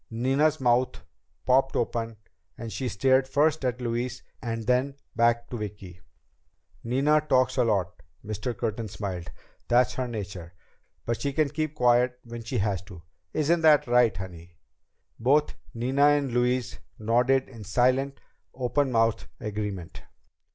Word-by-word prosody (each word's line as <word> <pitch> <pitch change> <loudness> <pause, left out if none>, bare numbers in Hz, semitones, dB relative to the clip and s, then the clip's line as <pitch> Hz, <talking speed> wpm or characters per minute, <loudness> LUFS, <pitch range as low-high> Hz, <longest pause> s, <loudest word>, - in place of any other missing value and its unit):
Nina's 135 +7 +1
mouth 125 0 +1 0.4
popped 135 +1 +3
open 115 -1 -2 0.4
and 115 -1 -6
she 130 - -3
stared 130 +4 +2
first 150 +2 +2
at 125 -1 -1
Louise 120 +1 -3 0.2
and 115 -2 -4
then 125 +3 +1 0.2
back 120 0 +2
to 120 - -3
Vicki. 100 -4 -8 0.8
"Nina 140 +6 +2
talks 130 -1 +3
a 125 - +4
lot." 95 -7 -1 0.2
Mr. 110 +3 -4
Curtin 115 -1 -2
smiled. 95 -4 -5 0.4
"That's 125 +1 +3
her 130 -1 -2
nature. 95 -6 -7 0.5
But 115 -1 -2
she 140 +2 -1
can 155 0 +2
keep 155 +1 -3
quiet 125 -1 +3
when 120 0 -8
she - - -3
has 100 -2 0
to. 90 -4 -12 0.3
Isn't 165 +2 +1
that 155 -2 +6
right, 120 -4 +3
honey?" 90 -3 -9 0.6
Both 145 +6 +3 0.2
Nina 130 +5 +3
and 145 -3 +2
Louise 125 -2 0 0.2
nodded 125 +4 +2
in 115 -4 -11
silent, 130 +6 +1 0.4
open 130 +2 0
mouthed 115 -1 +1
agreement. 100 -4 -5
120 Hz, 140 wpm, -27 LUFS, 110-130 Hz, 0.8 s, that